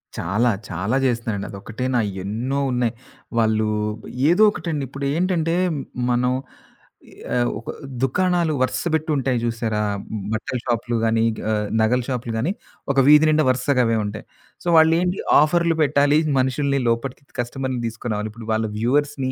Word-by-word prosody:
చాలా 105 +8 +1 0.2
చాలా 95 +8 -1
చేస్తున్నారండి. 115 -5 -1
అదొక్కటేనా 120 +5 -2 0.2
ఎన్నో 120 +8 -2
ఉన్నాయి. 125 -2 0 0.4
వాళ్ళు 110 -1 +2 0.6
ఏదో 180 +6 +5
ఒకటండి. 160 -7 -3
ఇప్పుడు 140 +1 -5
ఏంటంటే 170 -1 +1 0.6
మనం 125 +1 +2 1.0
ఆహ్, 120 0 +2
ఒక 115 - -11 0.3
దుకాణాలు 175 +4 +1
వరుస 130 - 0
పెట్టుంటాయి 150 -5 0
జూసారా? 115 -2 -1 0.5
బట్టల 110 +3 -2
షాపులు 120 0 -1
గాని 115 0 +2 0.3
ఆహ్, 105 -1 0
నగల 115 +3 +3
షాపులు 125 -3 -3
గాని 130 +11 0 0.4
ఒక 135 - -4
వీధి 150 +1 +7
నిండ 155 0 +3
వరుసగ 130 +1 +1
అవే 115 0 +1
ఉంటాయి. 105 +1 -6 0.4
సో - - -7
వాళ్ళ 160 0 +6
ఏంటి 180 +1 -1 0.2
ఆఫర్‌లూ 170 +2 +2
పెట్టాలి 145 0 +3 0.2
మనుషుల్ని 140 +2 +1
లోపటికి 125 +4 -2
కస్టమర్‌ని 130 +1 -2
తీసుకునిరావాలి. 110 -2 -3
ఇప్పుడు 115 0 -11
వాళ్ళ 110 0 0
వ్యూవర్స్‌నీ 135 +2 0
125 Hz, 135 wpm, -22 LUFS, 115-145 Hz, 1.0 s, వీధి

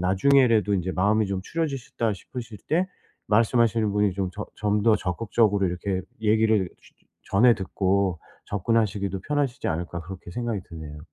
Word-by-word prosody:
나중에라도 105 +2 +4
이제 95 -1 -1
'마음이 105 +3 +2
좀 95 -1 -2
추려지셨다.' 135 -8 -2
싶으실 110 +3 -8
때 180 +4 +2 0.4
말씀하시는 115 -1 +3
분이 105 0 +2
좀 95 -1 -2
저 105 +1 -5
좀 105 0 0
더 110 0 +5
적극적으로 100 +1 +1
이렇게 95 +2 -2 0.2
얘기를 110 -3 +3
쉬 - - -21 0.4
전해 120 +5 +6
듣고 95 -1 0 0.3
'접근하시기도 100 -2 0
편하시지 140 +2 -1
않을까.' 85 +1 -3
그렇게 90 +1 -9
생각이 115 -4 -3
드네요. 80 -2 -8
105 Hz, 370 characters per minute, -25 LUFS, 95-115 Hz, 0.4 s, 전해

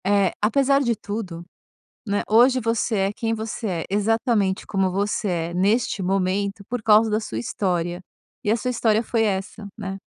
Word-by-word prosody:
É, 200 -2 +3
apesar 275 +6 +3
de 235 -4 +1
tudo, 195 -5 -6 0.6
né, 205 0 +1
hoje 250 +4 +5
você 230 0 0
é - - -6
quem 225 +1 -2
você 225 +1 -4
é, 170 -4 -2
exatamente 210 -1 +1
como 195 -1 0
você 200 +3 -1
é 170 -1 -2
neste 205 +4 +1
momento 195 +2 -1
por 245 -1 -3
causa 215 +1 +5
da 215 0 +1
sua 115 - -6
história, 175 - -2 0.4
e - - -1
a 220 - +4
sua 250 +2 -2
história 225 -2 +2
foi 225 0 0
essa, 200 0 -3
né. 195 -2 -5
210 Hz, 170 wpm, -23 LUFS, 190-225 Hz, 0.6 s, hoje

